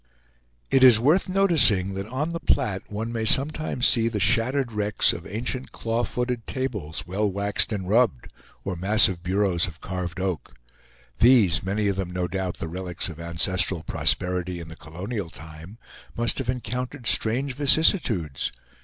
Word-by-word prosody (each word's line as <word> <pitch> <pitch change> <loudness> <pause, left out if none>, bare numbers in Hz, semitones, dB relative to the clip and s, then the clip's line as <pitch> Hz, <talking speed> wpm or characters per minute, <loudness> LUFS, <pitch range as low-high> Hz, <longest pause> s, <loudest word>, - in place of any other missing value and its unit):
It 135 - +4
is 125 -4 +8
worth 155 +11 +2
noticing 160 - +3
that 95 +1 -5
on 135 +7 -3
the 170 0 -4
Platte 105 -12 -1
one 110 +3 -4
may 115 -1 -3
sometimes 140 +2 +2
see 115 -2 +4
the 110 -2 -2
shattered 120 +5 +2
wrecks 105 -1 +1
of - - -8
ancient 125 +5 -4
claw 115 +1 -2
footed 125 -2 -3
tables, 105 - -4
well 100 +4 -1
waxed 100 +3 +1
and 95 -4 -4
rubbed, 110 - +1 0.4
or 95 - -3
massive 95 -1 +4
bureaus 95 -1 +1
of 80 -2 -10
carved 90 -2 -5
oak. 90 -10 -4 0.6
These, 110 - +5
many 100 +3 -1
of 100 -1 -1
them 95 -2 -3
no 90 0 -2
doubt 95 0 -4
the - - -5
relics 90 +1 -3
of 80 -1 -10
ancestral 85 +1 -1
prosperity 90 0 -1
in 85 -1 -9
the 80 - -10
colonial 90 +5 -6
time, 80 +6 -12 0.4
must 120 +3 0
have 130 -2 -4
encountered 125 +1 -4
strange 125 +6 0
vicissitudes. 135 - +1
105 Hz, 160 wpm, -24 LUFS, 90-125 Hz, 0.6 s, is